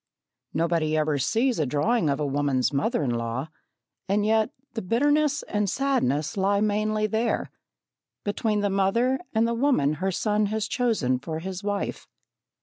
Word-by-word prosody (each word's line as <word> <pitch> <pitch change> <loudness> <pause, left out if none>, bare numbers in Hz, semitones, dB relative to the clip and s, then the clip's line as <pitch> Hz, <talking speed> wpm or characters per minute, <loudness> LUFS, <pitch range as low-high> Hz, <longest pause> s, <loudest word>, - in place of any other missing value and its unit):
Nobody 165 -1 +1
ever 155 -2 +1
sees 230 - +1
a 150 - +1
drawing 155 - +1
of 140 - 0
a 150 - 0
woman's 140 -2 0
mother 150 - 0
in 130 - 0
law, 120 +5 -3 0.6
and 205 +1 +2
yet, 220 0 +3 0.2
the 225 - -3
bitterness 290 +7 +2
and 210 -1 -1
sadness 155 - 0
lie 200 +1 +2
mainly 215 +1 +1
there 220 +2 -1 0.7
between 210 +1 0
the 205 -1 0
mother 230 +7 +2 0.2
and 225 +1 +3
the 235 - 0
woman 230 - +2
his 190 -1 -1
son 210 -1 +1
has 215 +1 -2
chosen 220 - 0
for 155 +4 -5
his 185 +3 -6
wife. 205 -1 -3
205 Hz, 155 wpm, -26 LUFS, 150-225 Hz, 0.7 s, yet